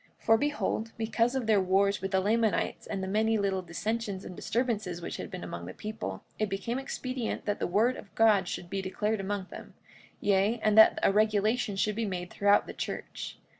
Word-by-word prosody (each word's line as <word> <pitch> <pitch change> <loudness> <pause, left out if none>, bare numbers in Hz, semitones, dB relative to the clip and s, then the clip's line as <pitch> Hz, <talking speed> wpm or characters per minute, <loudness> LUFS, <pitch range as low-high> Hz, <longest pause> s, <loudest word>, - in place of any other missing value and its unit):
45:21 - - -26
For 225 0 +6
behold, 285 -6 -1
because 230 +2 +1
of 260 -3 -1
their 215 -3 +4
wars 195 +2 +2
with 195 - -2
the 190 -1 +2
Lamanites 220 +2 0
and 195 -2 -3
the - - -3
many 220 +3 +2
little 195 -2 0
dissensions 200 +3 -3
and 180 - -8
disturbances 215 -8 -1
which 170 - -5
had - - -6
been - - -7
among 85 0 -6
the 90 - -8
people, 215 +1 -5 0.2
it 215 -1 0
became 230 +6 -2
expedient 255 -3 -4
that 205 0 -1
the - - 0
word 220 +8 +2
of 200 - -13
God 210 -4 +4
should 175 - -5
be 195 +2 -3
declared 210 +3 -1
among 195 0 -3
them, - - -10 0.4
yea, 205 +3 +2
and 215 -1 +3
that 220 0 +8
a - - +5
regulation 215 +1 +2
should 210 +2 0
be 225 -1 -1
made 180 -2 -4
throughout 205 0 +3
the - - -8
church. - - -5
210 Hz, 205 wpm, -29 LUFS, 195-225 Hz, 0.4 s, that